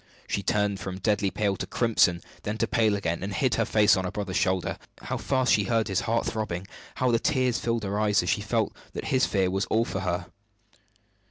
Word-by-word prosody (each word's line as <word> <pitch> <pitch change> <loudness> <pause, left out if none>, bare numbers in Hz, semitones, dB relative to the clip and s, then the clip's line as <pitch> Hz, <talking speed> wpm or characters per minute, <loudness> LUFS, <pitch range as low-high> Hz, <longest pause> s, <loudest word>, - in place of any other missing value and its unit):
She 100 - -1
turned 100 -1 0
from 95 -1 -5
deadly 100 +1 +1
pale 100 +1 0
to - - -4
crimson, 95 -8 +2 0.2
then 105 +1 -3
to 115 - 0
pale 110 -3 +2
again, 85 -4 -2
and 95 +2 -3
hid 120 +5 +1
her 115 +1 +1
face 105 -1 +4
on 95 - -1
her 90 - -2
brother's 95 -2 -4
shoulder. 95 -1 0 0.2
How - - -3
fast 130 -2 +1
she 105 - +3
heard 115 +1 +1
his 95 - +1
heart 115 0 +1
throbbing! 100 -5 -3 0.3
How 125 -1 +1
the 115 - +3
tears 130 -4 +1
filled 115 -1 -1
her 100 +1 -2
eyes 105 -2 +3
as - - -2
she - - 0
felt - - -1 0.2
that - - -5
his 130 0 +3
fear 95 -2 +1
was 95 +1 0
all 115 +1 +1
for - - -3
her! 90 -1 -2
105 Hz, 225 wpm, -27 LUFS, 95-115 Hz, 0.3 s, face